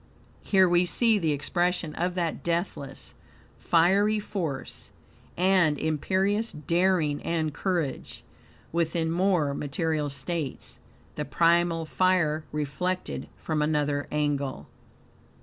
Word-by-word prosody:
Here 190 -2 +4
we 175 0 +3
see 225 +2 +3
the 160 -4 +1
expression 170 +3 -1
of 175 +3 -2
that 170 -3 -2
deathless, 170 -4 -3 0.5
fiery 200 +6 +3
force, 170 -10 -5 0.5
and 180 -5 +3
imperious 190 - 0
daring 165 0 +1
and 160 -3 -1
courage, 175 -7 -3 0.5
within 165 0 0
more 175 -5 +2
material 150 +1 -1
states; 140 +1 -5 0.4
the - - -1
primal 170 -1 +2
fire 160 -3 +1
reflected 165 +5 -3
from 155 -2 -2
another 150 -1 0
angle. 145 -3 -2
165 Hz, 100 wpm, -27 LUFS, 150-185 Hz, 0.5 s, Here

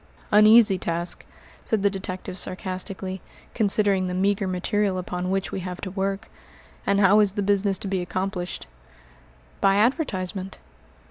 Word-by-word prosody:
"An 210 +1 +7
easy 215 -4 +6
task," 170 +1 -3 0.4
said 215 -3 0
the 200 - +5
detective 185 -1 -5
sarcastically, 185 0 -5 0.3
"considering 200 -3 +2
the 180 - -3
meagre 195 +1 +1
material 190 +1 0
upon 180 0 -3
which 195 0 -1
we - - -3
have 180 0 -6
to 190 - -5
work. 195 +2 -2 0.6
And 200 0 +3
how 200 +1 +6
is 205 -2 +3
the 205 - -1
business 200 -1 +1
to 195 - -7
be 190 -1 -1
accomplished?" 185 0 -4 1.0
"By 195 0 +4
advertisement." 200 - -1
195 Hz, 145 wpm, -24 LUFS, 185-205 Hz, 1.0 s, An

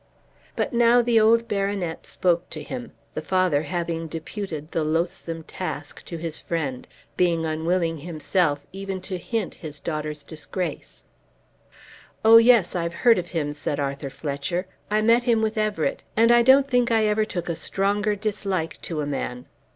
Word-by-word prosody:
But - - -1
now 240 +1 +5
the 235 -1 +4
old 230 +2 +4
baronet 195 -4 -2
spoke 175 -1 0
to - - -7
him, 245 -2 -6 0.2
the - - -3
father 185 -6 +2
having 165 0 -3
deputed 160 -1 -6
the 165 - 0
loathsome 165 +1 -2
task 145 -5 -6
to 170 - -6
his 165 -1 -4
friend, 145 -7 -3 0.3
being 170 -2 +2
unwilling 165 +1 0
himself 155 -2 0
even 195 0 -4
to 185 -1 -5
hint 225 +2 -2
his 150 -3 -7
daughter's 150 -2 -4
disgrace. 160 +2 -6 1.2
"Oh, 225 +1 +10
yes, 230 -6 +5
I've 170 -1 -2
heard 230 -5 +7
of 175 - -5
him," 155 -4 -2
said 145 0 -3
Arthur 140 0 -3
Fletcher. 145 +6 -3 0.2
"I 215 +1 +2
met 235 +2 +4
him 230 -3 +3
with 220 0 0
Everett, 215 +5 0 0.2
and 230 +1 +6
I 240 0 +7
don't 265 +3 +6
think 245 -2 +2
I 225 -2 +3
ever 210 +1 +2
took 185 -5 -4
a 170 - 0
stronger 205 +4 0
dislike 195 -5 -3
to 160 -3 -3
a - - -2
man. 125 -3 -4
180 Hz, 165 wpm, -24 LUFS, 160-215 Hz, 1.2 s, Oh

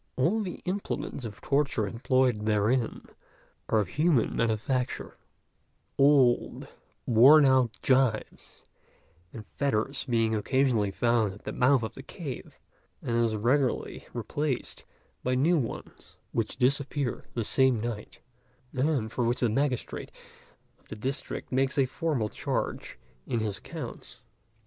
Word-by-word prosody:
All 180 +12 +2
the 185 -4 -5
implements 185 -8 -3
of 105 -1 -8
torture 140 -7 +1
employed 120 -1 +1
therein 110 +3 +1 0.6
are 110 - +3
of 105 - 0
human 150 - +2
manufacture; 115 +3 -1 0.8
old, 135 -3 +3 0.4
worn 135 +6 +7
out 130 -4 +3
gyves 130 -4 0 0.7
and 110 -2 -9
fetters 140 0 -1
being 115 -3 +1
occasionally 115 -1 +1
found 115 -1 +1
at 100 - -14
the - - -4
mouth 130 -1 +3
of 110 - -4
the - - -9
cave, 140 -2 -8 0.5
and 115 - -1
as 115 -2 +2
regularly 125 +5 0
replaced 125 +4 -3 0.4
by 125 0 +1
new 160 +6 +3
ones, 120 - -7
which 115 +1 -2
disappear 140 0 0
the 115 - 0
same 130 +1 +3
night, 110 -2 -6 0.5
and 130 -5 0
for 125 - -1
which 120 +2 0
the 120 - +3
magistrate 130 +1 -2 0.7
of - - -30
the - - -7
district 130 +6 -4
makes 135 +2 +1
a 135 - +4
formal 135 -4 -1
charge - - -3 0.3
in 120 - 0
his 105 -3 -2
accounts. - - -9
125 Hz, 130 wpm, -28 LUFS, 110-140 Hz, 0.8 s, worn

